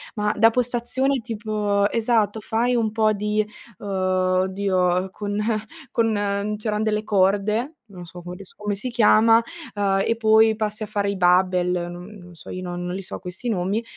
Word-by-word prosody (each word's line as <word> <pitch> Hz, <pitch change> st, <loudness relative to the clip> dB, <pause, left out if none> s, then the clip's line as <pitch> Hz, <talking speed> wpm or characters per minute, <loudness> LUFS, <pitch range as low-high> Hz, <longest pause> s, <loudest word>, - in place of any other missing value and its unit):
ma 210 Hz, -1 st, 0 dB
da 225 Hz, +2 st, +6 dB
postazione 250 Hz, +3 st, 0 dB
tipo 210 Hz, -2 st, -1 dB
esatto, 220 Hz, -2 st, +1 dB
fai 235 Hz, +4 st, 0 dB
un 225 Hz, -2 st, +1 dB
po' 215 Hz, 0 st, +2 dB
di 210 Hz, +1 st, 0 dB, 0.3 s
uhm, 205 Hz, -, -9 dB
oddio 185 Hz, 0 st, +1 dB
con 205 Hz, 0 st, -4 dB, 0.5 s
con 225 Hz, -4 st, +1 dB
ehm, 205 Hz, +1 st, -1 dB
c'eran 210 Hz, 0 st, -2 dB
delle 215 Hz, -1 st, 0 dB
corde, 210 Hz, +7 st, +1 dB
non 185 Hz, -5 st, -11 dB
so 175 Hz, +1 st, -11 dB
come 175 Hz, +1 st, -8 dB
adesso 190 Hz, 0 st, -12 dB
come 210 Hz, -1 st, -2 dB
si 215 Hz, +6 st, -4 dB
chiama, 225 Hz, -1 st, +5 dB, 0.3 s
ehm, 195 Hz, -1 st, +1 dB
e 230 Hz, -, 0 dB
poi 220 Hz, 0 st, +4 dB
passi 215 Hz, 0 st, -2 dB
a -, -, -2 dB
fare 205 Hz, -1 st, -1 dB
i 200 Hz, -, -2 dB
barbell 180 Hz, 0 st, +3 dB, 0.2 s
non 175 Hz, 0 st, -8 dB
non 175 Hz, -1 st, -14 dB
so, -, -, -13 dB
io 185 Hz, -, -5 dB
non 175 Hz, -1 st, -5 dB
non 180 Hz, -, -3 dB
li 190 Hz, -, -4 dB
so -, -, -7 dB
questi 185 Hz, +6 st, -7 dB
nomi, 200 Hz, +2 st, -1 dB
210 Hz, 180 wpm, -23 LUFS, 185-220 Hz, 0.5 s, da